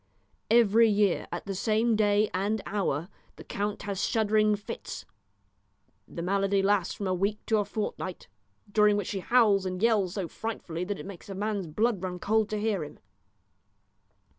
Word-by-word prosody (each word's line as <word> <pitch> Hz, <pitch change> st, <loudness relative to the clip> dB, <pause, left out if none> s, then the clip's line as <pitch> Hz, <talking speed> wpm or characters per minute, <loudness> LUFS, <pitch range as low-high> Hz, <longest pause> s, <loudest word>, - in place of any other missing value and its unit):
Every 230 Hz, 0 st, +5 dB
year 205 Hz, -3 st, +2 dB
at 175 Hz, -, -5 dB
the 200 Hz, -, -3 dB
same 220 Hz, +4 st, +1 dB
day 210 Hz, 0 st, +3 dB
and 205 Hz, +4 st, 0 dB
hour 175 Hz, -6 st, -1 dB, 0.3 s
the -, -, -11 dB
count 205 Hz, +1 st, -3 dB
has 200 Hz, -2 st, -3 dB
shuddering 215 Hz, -1 st, +2 dB
fits. 205 Hz, -, -7 dB, 1.0 s
The 170 Hz, -, -6 dB
malady 195 Hz, +1 st, +1 dB
lasts 195 Hz, -3 st, +1 dB
from 200 Hz, -, -5 dB
a 185 Hz, -, 0 dB
week 200 Hz, +4 st, -1 dB
to 220 Hz, -1 st, +2 dB
a 205 Hz, -, 0 dB
fortnight, 200 Hz, -3 st, -4 dB, 0.4 s
during 210 Hz, 0 st, +4 dB
which 205 Hz, -, -3 dB
he 195 Hz, -, -2 dB
howls 210 Hz, -2 st, +3 dB
and 185 Hz, -1 st, -3 dB
yells 205 Hz, -4 st, +2 dB
so 190 Hz, -4 st, -2 dB
frightfully 180 Hz, -5 st, -5 dB
that 200 Hz, +1 st, -3 dB
it -, -, -8 dB
makes 195 Hz, 0 st, -10 dB
a 195 Hz, -, -5 dB
man's 205 Hz, -2 st, -2 dB
blood 210 Hz, +5 st, 0 dB
run 185 Hz, -1 st, -4 dB
cold 215 Hz, +3 st, +1 dB
to 215 Hz, -, -2 dB
hear 210 Hz, -5 st, 0 dB
him. 150 Hz, -, -10 dB
205 Hz, 170 wpm, -28 LUFS, 190-215 Hz, 1.0 s, Every